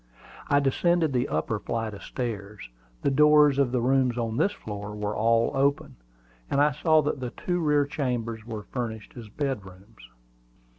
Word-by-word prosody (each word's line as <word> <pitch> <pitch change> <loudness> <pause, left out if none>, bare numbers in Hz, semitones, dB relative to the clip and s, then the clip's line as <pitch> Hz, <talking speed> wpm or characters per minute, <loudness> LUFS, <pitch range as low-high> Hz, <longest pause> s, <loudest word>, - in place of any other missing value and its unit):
I 145 - +4
descended 160 +3 +1
the 125 -1 +1
upper 80 +8 -1
flight 115 -1 -3
of 100 - -9
stairs. 105 - -5 0.4
The 140 - +2
doors 150 0 +5
of 135 -3 +2
the 125 -1 0
rooms 130 -1 +2
on 115 -2 -2
this 200 - +2
floor 105 - -7
were 105 0 -3
all 115 +2 +2
open, 140 - 0 0.5
and 140 - +1
I 150 +1 +4
saw 155 +2 +3
that 145 -1 -2
the 125 -1 -4
two 180 +7 -3
rear 150 -3 +2
chambers 120 -6 -3
were 110 -2 -6
furnished 110 -4 -5
as 115 -4 -9
bedrooms. 105 -6 -6
125 Hz, 165 wpm, -26 LUFS, 110-145 Hz, 0.5 s, doors